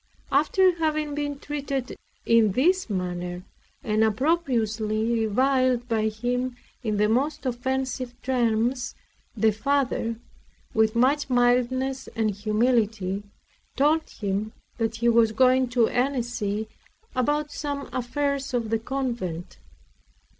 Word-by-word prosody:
After 375 -2 +4
having 310 -2 0
been 290 -1 -2
treated 280 -3 -4 0.3
in 225 -4 +4
this 355 - +2
manner, 180 -2 -3 0.4
and 215 0 +2
opprobriously 225 -4 +1
reviled 255 +1 +2
by 220 -2 +1
him 245 +3 -2 0.3
in 215 -3 -1
the 210 +1 +3
most 270 +7 0
offensive 255 0 -2
terms, 245 0 0 0.4
the 220 +1 +4
Father, 255 0 0 0.6
with 220 0 +2
much 275 +5 +2
mildness 255 +2 +1
and 220 -2 +1
humility, 215 -2 0 0.5
told 305 +4 +2
him 205 +1 -3 0.3
that 225 -1 0
he 235 +1 0
was 230 -2 +4
going 255 +2 +4
to 240 -2 +3
Annecy 240 -5 -1 0.5
about 295 +4 0
some 285 -2 -4
affairs 275 +1 -1
of 230 -2 -1
the 225 - +2
convent. 230 -9 -4
245 Hz, 110 wpm, -25 LUFS, 220-270 Hz, 0.6 s, After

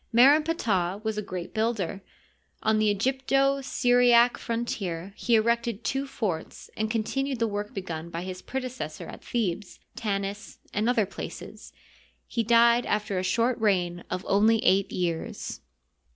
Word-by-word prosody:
Mer 250 +5 +7
en 310 - +3
Ptah 200 - 0
was 220 -1 -1
a 210 - -2
great 185 -3 -6
builder. 215 -4 -1 0.6
On 220 0 +3
the 215 -1 +3
Egypto 270 +5 +1
Syriac 245 -2 +4
frontier 195 -6 -3
he 235 - +2
erected 235 0 +1
two 270 +1 -1
forts 195 -11 -4
and 220 0 -1
continued 260 +4 -1
the 230 - +1
work 205 -1 -3
be 195 - -2
gun 165 -2 -6
by 170 +1 -5
his 185 0 -6
predecessors 255 - -5
at - - -12
Thebes, 205 -5 -2 0.2
Tanis, 200 -2 -3 0.2
and 215 +3 +1
other 230 -4 +3
places. 195 - -8 0.5
He 235 - -1
died 235 +1 +4
after 210 -2 0
a - - -2
short 230 +6 +1
reign 180 -5 +1
of 180 +1 -4
only 215 +3 +4
eight 195 -3 +3
years. 170 -3 -3
220 Hz, 150 wpm, -27 LUFS, 190-240 Hz, 0.6 s, Mer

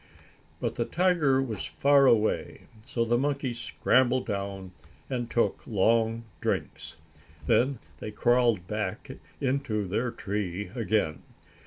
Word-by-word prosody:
But - - -3
the - - 0
tiger 160 -7 +2
was 110 -6 -4
far 140 -1 +4
away, 110 -3 +2 0.3
so 115 -1 0
the 120 +1 +2
monkeys 135 -3 -1
scrambled 130 +1 +2
down 100 -2 -4 0.4
and 120 -2 -2
took 120 - +1
long 115 +2 +2 0.2
drinks. - - -3 0.5
Then 130 - +3 0.2
they - - -5
crawled 120 -3 +2
back 105 -1 -4 0.3
into 130 -7 -1
their 110 +6 -1
tree 100 -3 -4
again. 105 -9 0
115 Hz, 120 wpm, -28 LUFS, 105-130 Hz, 0.5 s, far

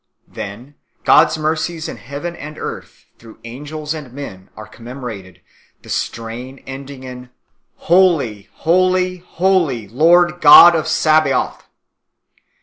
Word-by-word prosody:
Then 115 +8 -9 0.3
God - - +6
s 160 - -4
mercies 155 +1 -2
in - - -7
heaven 145 +8 -7
and 155 0 -10
earth, - - -8
through 115 -1 -15
angels 150 +6 -6
and 150 -6 -9
men, 110 -9 -9
are 110 - -9
com 115 +2 -15
memorated, 110 -9 -9 0.4
the - - -15
strain 115 +4 -5
ending 135 0 -9
in 125 -1 -10 0.3
" - - -50
Holy, 160 - +2
Holy, 185 +2 +1
Holy, 175 - -1
Lord 175 - +3
God 170 +3 +9
of 155 - -1
Sabaoth." 155 -4 +1
145 Hz, 130 wpm, -17 LUFS, 120-165 Hz, 0.4 s, God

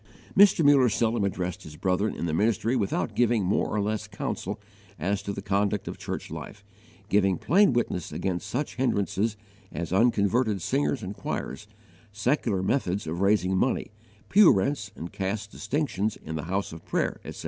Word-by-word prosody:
Mr. 195 -5 +6
Muller 140 -4 +6
seldom 115 0 +1
addressed 90 -3 -2
his 75 - -11
brethren 95 +6 0
in - - -3
the 80 - -1
ministry 110 +6 +1
without 100 -6 -1
giving 120 -3 +3
more 95 - +1
or 105 - -1
less 105 +1 -1
counsel 100 -2 -4 0.4
as 100 +2 -1
to 100 - -4
the 100 -1 -6
conduct 100 0 0
of - - -6
church - - -5
life, 105 - -8 0.4
giving 95 -3 +3
plain 195 - +4
witness 120 -8 -1
against 95 +1 -2
such 135 +5 -3
hindrances 110 -3 0 0.3
as 85 0 -4
unconverted 110 0 +2
singers 135 - 0
and 95 +2 -5
choirs, 105 - -5 0.4
secular 105 -2 0
methods 100 -5 0
of 85 +3 -3
raising 100 -2 +3
money, 120 +5 0 0.4
pew 205 -2 +7
rents 105 0 0
and 85 -2 -7
caste 100 +2 -3
distinctions 110 -8 -2
in 80 - -5
the 80 - -4
house 95 +1 -2
of 80 - -10
prayer, - - -1
etc. - - -8
105 Hz, 170 wpm, -27 LUFS, 95-120 Hz, 0.4 s, pew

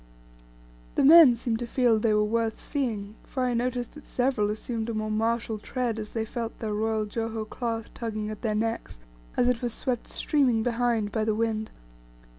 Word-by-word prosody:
The - - +3
men 300 -3 +9
seemed 230 -1 -2
to 240 - -4
feel 240 -3 +3
they 215 -1 +2
were 210 - +3
worth 225 +1 0
seeing, 220 -8 -3
for 260 - -3
I 250 -1 +1
noticed 245 0 -1
that 300 - -13
several 245 -5 +1
assumed 225 +1 -3
a 230 - -2
more 215 0 -2
martial 225 0 0
tread 240 0 -2
as 210 -1 -7
they 225 -1 -1
felt 230 0 -5
their 215 -2 -3
royal 220 0 0
Joho 225 0 -3
cloth 230 -1 -4
tugging 215 -2 -4
at 215 - -8
their 215 -3 0
necks, 225 - -2 0.4
as 245 - +3
it 250 -2 +1
was 240 -2 -2
swept 250 -3 -2
streaming 255 -7 +1
behind 235 -3 0
by 220 +1 0
the 215 -1 +1
wind. 220 -1 -1
225 Hz, 190 wpm, -27 LUFS, 215-245 Hz, 0.4 s, men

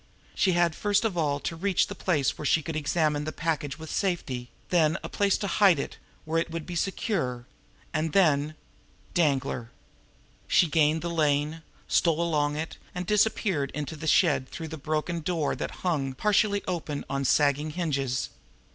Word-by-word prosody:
She 185 - +2
had 175 -1 +3
first 205 +5 +1
of 210 -5 0
all 145 -4 +1
to 165 - -3
reach 190 +2 +1
a - - -5
place 165 -8 0
where 150 - -7
she 160 - +3
could 165 0 -4
examine 150 -1 +1
the 155 - -3
package 155 -4 -2
with 160 0 -8
safety; 135 -11 -2 0.2
then 165 -2 +3
a - - -5
place 200 -1 +2
to - - -3
hide 195 -2 +4
it 140 - -4 0.3
where 160 +1 +1
it 170 - -4
would 165 -1 -5
be 175 - -6
secure; 165 - -1 0.5
and 160 0 0
then 155 -4 +3 0.6
Danglar! 135 -7 +1 0.8
She - - +5
gained 155 0 +2
the 170 - -2
lane, 150 0 +1 0.3
stole 165 -2 +2
along 150 -3 +1
it, 160 +2 -4 0.2
and 180 0 -3
disappeared 210 - +1
into 150 +1 -4
the 155 +1 -6
shed 140 -6 +3
through 160 -1 -6
the 160 - -5
broken 155 +3 -2
door 165 -2 -1
that - - -3 0.2
hung, 140 -7 0
partially 205 - +2
open, 160 -5 -3
on 140 0 -2
sagging 145 +2 +2
hinges. 140 -6 -1
160 Hz, 175 wpm, -27 LUFS, 145-175 Hz, 0.8 s, She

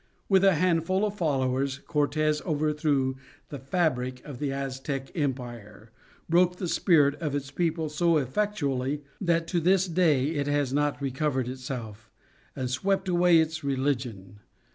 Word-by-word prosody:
With 190 -1 +4
a 195 -2 +5
handful 180 +3 +1
of 205 - -2
followers 135 -5 0
Cortes 150 0 +1
overthrew 150 -4 0 0.3
the 145 - -6
fabric 130 -4 -1
of 140 -5 -8
the 145 -2 -1
Aztec 135 0 -4
Empire, 120 - -5 0.4
broke 180 +2 +3
the 180 0 -4
spirit 160 -4 +3
of 150 -3 -2
its 140 -1 -4
people 160 0 -1
so 165 +2 +2
effectually 145 - -1 0.2
that 170 -3 +1
to 175 - +1
this 185 +3 +3
day 160 -6 +2
it 145 -3 -2
has 145 -2 0
not 145 0 0
recovered 135 -1 -1
itself, 125 -4 -7 0.5
and 125 -1 -3
swept 190 +8 0
away 175 -1 +4
its 160 -1 0
religion. 125 -8 -2
145 Hz, 140 wpm, -27 LUFS, 130-170 Hz, 0.5 s, a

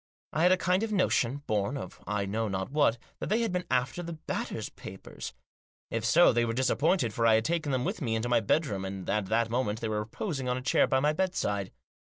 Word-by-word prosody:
I 155 - 0
had 180 +2 +6
a 185 - +5
kind 185 +1 +1
of 225 -1 -2
notion, 145 - +1
born 105 +6 0
of - - -8
I 105 -1 -1
know 110 +3 -1
not 95 +2 -3
what, 145 -5 +3 0.2
that - - -4
they 220 +3 +2
had 230 -4 0
been 180 0 -2
after 125 +6 0
the 170 -1 -5
Batters' 155 - -4
papers. 95 -8 -9 0.6
If 115 -1 -1
so, 165 +8 +6
they 120 0 +2
were 115 -1 -1
disappointed, 130 - +2
for 115 +1 +2
I 110 - +6
had 110 +1 +1
taken 165 -3 0
them 130 -1 0
with - - -3
me 115 -5 0
into 110 +2 -1
my 120 - +4
bedroom, 110 -3 0
and 95 -1 -5
at 105 -2 0
that 115 +2 +1
moment 115 -3 0
they 110 - -3
were 105 -1 0
reposing 130 - -3
on 125 - 0
a - - -4
chair - - +3
by 130 - +2
my 150 +2 +3
bedside. 150 - -1
125 Hz, 235 wpm, -29 LUFS, 110-160 Hz, 0.6 s, had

